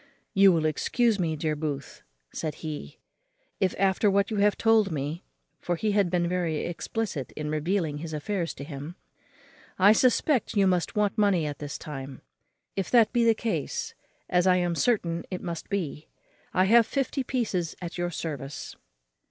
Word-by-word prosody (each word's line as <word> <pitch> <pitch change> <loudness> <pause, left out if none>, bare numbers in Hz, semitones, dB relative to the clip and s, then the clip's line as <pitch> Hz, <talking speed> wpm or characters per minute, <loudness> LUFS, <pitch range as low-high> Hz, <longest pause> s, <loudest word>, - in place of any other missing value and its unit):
"You 195 -1 +7
will 165 -3 +1
excuse 220 - +1
me, 165 -3 0
dear 155 0 -1
Booth," 145 -3 -5 0.3
said 155 -2 -3
he, 145 - -6 0.6
"if, 185 - +1
after 195 +2 +3
what 200 +2 +2
you 215 - -1
have 205 0 +3
told 220 -3 +3
me" 150 +3 -3 0.4
(for 175 - -1
he 210 +5 0
had 200 -3 +2
been 175 -1 +1
very 170 -3 -1
explicit 175 - -3
in 150 0 -4
revealing 155 -1 -1
his 160 +1 -6
affairs 170 +3 -2
to - - -7
him), 145 +3 -7 0.8
"I 200 +3 +7
suspect 255 +2 +2
you 200 -1 +4
must 180 -2 +1
want 210 0 +1
money 195 -6 +3
at 145 -1 -4
this 145 0 -5
time. 135 -3 -8 0.5
If 195 -2 -2
that 235 -3 +5
be 240 -1 +3
the 230 -1 +4
case, 210 -11 -3 0.3
as 180 +1 +2
I 185 - +6
am 175 -1 +1
certain 170 -5 +1
it 185 - -5
must 170 -2 -5
be, 165 -6 -3 0.4
I 185 - +3
have 230 +3 +5
fifty 275 +1 -1
pieces 210 -10 -1
at 175 0 -6
your 175 0 0
service." 145 -5 -5
180 Hz, 170 wpm, -27 LUFS, 155-205 Hz, 0.8 s, You